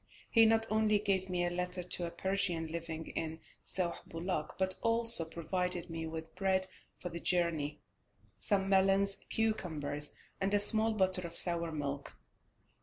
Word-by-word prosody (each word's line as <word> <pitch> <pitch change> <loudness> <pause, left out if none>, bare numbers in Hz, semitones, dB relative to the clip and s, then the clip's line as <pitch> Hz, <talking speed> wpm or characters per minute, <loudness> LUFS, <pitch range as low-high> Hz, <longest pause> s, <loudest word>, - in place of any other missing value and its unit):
He 225 -1 +7
not 225 0 +3
only 215 -1 +3
gave 195 -2 0
me 175 -1 0
a 175 - -1
letter 180 0 -3
to 175 0 -1
a - - -4
Persian 175 -1 -1
living 160 0 -5
in 160 0 -4 0.2
Sauh 175 -2 -1
Bulak, 165 -2 -3
but 190 0 +1
also 230 -5 +5
provided 175 +2 -2
me 165 0 -4
with 160 0 -7
bread 190 0 +1 0.3
for 180 - -6
the 170 0 -6
journey, 165 -5 0 0.6
some 195 -2 +1
melons, 195 0 +4
cucumbers, 155 -10 0 0.2
and 200 +1 +1
a - - +4
small 220 +2 +3
bottle 185 -3 +2
of 170 - -7
sour 170 -2 +2
milk. 140 -2 -4
180 Hz, 155 wpm, -33 LUFS, 165-195 Hz, 0.6 s, He